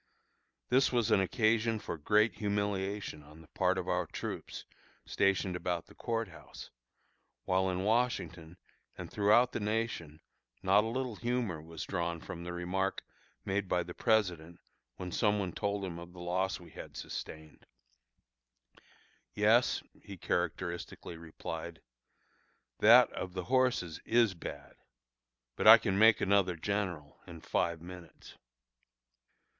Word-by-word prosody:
This 130 Hz, +2 st, +4 dB
was 120 Hz, -4 st, +1 dB
an 95 Hz, -, +5 dB
occasion 110 Hz, +3 st, +2 dB
for 105 Hz, -, -5 dB
great 105 Hz, +7 st, +2 dB
humiliation 100 Hz, -4 st, -2 dB
on 75 Hz, +2 st, -15 dB
the 80 Hz, -, -17 dB
part 95 Hz, 0 st, +1 dB
of 95 Hz, -, -3 dB
our -, -, 0 dB
troops, -, -, -6 dB, 0.4 s
stationed 95 Hz, -1 st, +1 dB
about 90 Hz, -1 st, -2 dB
the -, -, -17 dB
Court 115 Hz, -3 st, -3 dB
House, 85 Hz, -, -12 dB, 0.7 s
while 95 Hz, 0 st, +2 dB
in 90 Hz, 0 st, -2 dB
Washington 90 Hz, -7 st, -1 dB, 0.4 s
and -, -, -8 dB
throughout 110 Hz, +5 st, +4 dB
the -, -, -3 dB
nation 105 Hz, -8 st, -2 dB, 0.4 s
not 100 Hz, +2 st, +5 dB
a -, -, -2 dB
little 125 Hz, -1 st, -3 dB
humor 120 Hz, -9 st, -2 dB
was 80 Hz, -1 st, -7 dB
drawn 85 Hz, -3 st, -2 dB
from 85 Hz, +1 st, -8 dB
the 90 Hz, -, -5 dB
remark 90 Hz, +2 st, -2 dB, 0.4 s
made 100 Hz, 0 st, -1 dB
by 90 Hz, -, +1 dB
the 90 Hz, +1 st, -8 dB
President 90 Hz, -8 st, 0 dB, 0.4 s
when 90 Hz, -1 st, -6 dB
some 105 Hz, +2 st, +2 dB
one 95 Hz, -3 st, -2 dB
told 100 Hz, -1 st, -2 dB
him 85 Hz, -2 st, -6 dB
of 85 Hz, +1 st, -11 dB
the 90 Hz, -, -12 dB
loss 90 Hz, +2 st, -1 dB
we 85 Hz, -, -14 dB
had -, -, -10 dB
sustained; 80 Hz, -1 st, -8 dB, 1.7 s
"Yes," -, -, +3 dB, 0.2 s
he 100 Hz, -1 st, -10 dB
characteristically 85 Hz, 0 st, -3 dB
replied, 80 Hz, 0 st, -7 dB, 1.0 s
"that -, -, +7 dB
of 90 Hz, -1 st, -5 dB
the 90 Hz, -, -3 dB
horses 125 Hz, -9 st, +1 dB
is 115 Hz, -3 st, +3 dB
bad; 70 Hz, -5 st, -9 dB, 0.8 s
but -, -, +1 dB
I -, -, +12 dB
can 95 Hz, -, -1 dB
make 110 Hz, +1 st, +6 dB
another 95 Hz, -2 st, +2 dB
general 90 Hz, -4 st, -3 dB
in 85 Hz, -2 st, -10 dB
five 85 Hz, 0 st, -1 dB
minutes." 90 Hz, -1 st, -12 dB
95 Hz, 140 wpm, -32 LUFS, 85-105 Hz, 1.7 s, I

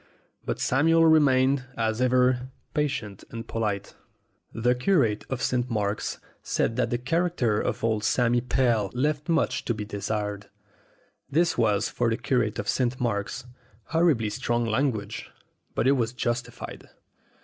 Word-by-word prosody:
But -, -, -3 dB
Samuel 165 Hz, +5 st, +4 dB
remained, 135 Hz, -4 st, +4 dB
as 110 Hz, +1 st, 0 dB
ever, 125 Hz, 0 st, +2 dB, 0.2 s
patient 135 Hz, -10 st, -2 dB
and 115 Hz, 0 st, -7 dB
polite. 105 Hz, -3 st, -2 dB, 0.6 s
The 120 Hz, +2 st, +1 dB
curate 125 Hz, -, +1 dB
of 130 Hz, -1 st, -3 dB
St. 125 Hz, 0 st, 0 dB
Mark's 105 Hz, -2 st, -1 dB, 0.2 s
said 115 Hz, -, 0 dB
that 120 Hz, -2 st, +1 dB
the 120 Hz, -, 0 dB
character 130 Hz, -5 st, 0 dB
of -, -, -3 dB
old 110 Hz, -2 st, +1 dB
Sammy 120 Hz, +2 st, +2 dB
Pell 120 Hz, -5 st, +1 dB
left 150 Hz, +4 st, -1 dB
much 165 Hz, -1 st, +1 dB
to 120 Hz, -, 0 dB
be 105 Hz, -1 st, -5 dB
desired. 105 Hz, 0 st, -3 dB, 0.8 s
This 170 Hz, +3 st, +2 dB
was, 105 Hz, -4 st, +2 dB
for 120 Hz, -1 st, 0 dB
the 115 Hz, -, 0 dB
curate 120 Hz, -3 st, 0 dB
of 105 Hz, -, -4 dB
St. 125 Hz, +1 st, 0 dB
Mark's, 115 Hz, +1 st, -2 dB, 0.4 s
horribly 160 Hz, -10 st, +2 dB
strong 120 Hz, +2 st, -1 dB
language; 110 Hz, -3 st, -1 dB, 0.5 s
but -, -, +1 dB
it 135 Hz, -, +5 dB
was 120 Hz, -4 st, +1 dB
justified. 120 Hz, -1 st, -4 dB
120 Hz, 140 wpm, -26 LUFS, 110-130 Hz, 0.8 s, it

